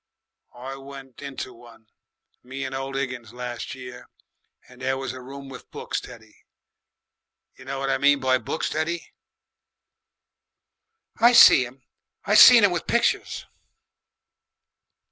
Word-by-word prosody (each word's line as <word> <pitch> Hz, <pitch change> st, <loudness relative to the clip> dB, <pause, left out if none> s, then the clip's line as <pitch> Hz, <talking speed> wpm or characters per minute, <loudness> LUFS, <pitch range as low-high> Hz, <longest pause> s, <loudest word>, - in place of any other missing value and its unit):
I 135 Hz, +2 st, -7 dB
went 135 Hz, -1 st, -12 dB
into 140 Hz, -2 st, -7 dB
one 115 Hz, -1 st, -17 dB, 0.6 s
me 135 Hz, +2 st, -7 dB
and 130 Hz, -, -6 dB
old 135 Hz, 0 st, -5 dB
Higgins 125 Hz, -4 st, -5 dB
las' 125 Hz, 0 st, -6 dB
year 125 Hz, -1 st, -11 dB, 0.6 s
and 125 Hz, 0 st, -17 dB
there 130 Hz, +1 st, -1 dB
was 130 Hz, -2 st, -5 dB
a 130 Hz, -, -9 dB
room 135 Hz, +2 st, -10 dB
with 135 Hz, -1 st, -12 dB
books, -, -, -5 dB
Teddy -, -, -14 dB, 1.2 s
you 130 Hz, -, -15 dB
know 135 Hz, +1 st, -5 dB
what 135 Hz, 0 st, -2 dB
I -, -, 0 dB
mean 145 Hz, 0 st, +4 dB
by 130 Hz, -1 st, +1 dB
books, 160 Hz, -, -3 dB
Teddy?" 165 Hz, +2 st, -3 dB, 2.0 s
"I 235 Hz, +2 st, +5 dB
seen 130 Hz, -, +8 dB
'em. 130 Hz, +1 st, -18 dB, 0.4 s
I -, -, 0 dB
seen -, -, +9 dB
'em -, -, +2 dB
with -, -, -4 dB
pictures." -, -, 0 dB
130 Hz, 135 wpm, -24 LUFS, 125-135 Hz, 2.0 s, seen